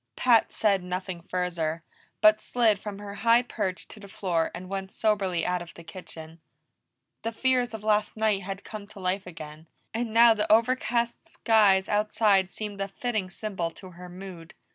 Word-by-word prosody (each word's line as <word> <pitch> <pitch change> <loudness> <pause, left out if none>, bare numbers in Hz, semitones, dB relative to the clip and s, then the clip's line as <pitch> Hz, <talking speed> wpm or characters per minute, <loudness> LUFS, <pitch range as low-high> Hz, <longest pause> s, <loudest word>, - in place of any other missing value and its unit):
Pat 235 -3 +4
said 200 -3 +2
nothing 180 0 -5
further, 170 -3 -2 0.4
but 215 0 +6
slid 225 -5 +2
from 205 -1 -6
her 205 0 -8
high 230 +2 +5
perch 195 -7 -3
to 220 - -12
the 200 - -11
floor 180 -5 -1
and 185 - -8
went 195 0 -5
soberly 195 -6 0
out 180 -1 0
of 175 - -10
the 170 - -11
kitchen. 165 -2 -10 0.8
The 230 - -2
fears 250 0 +1
of 215 - -9
last 210 0 +1
night 215 -2 +2
had 195 +1 -6
come 210 -2 -8
to 210 -1 -13
life 185 +1 -2
again, 155 -2 -10 0.3
and 230 0 -2
now 230 +1 +7
the 210 -1 -1
over 230 +4 +5
cast 235 -2 -2
skies 205 -4 +3
outside 210 -2 +2
seemed 205 -1 -6
a 195 - -1
fitting 215 -2 -3
symbol 190 -4 -3
to 185 -2 -10
her 180 +1 -11
mood. 180 -2 -10
200 Hz, 180 wpm, -27 LUFS, 180-220 Hz, 0.8 s, now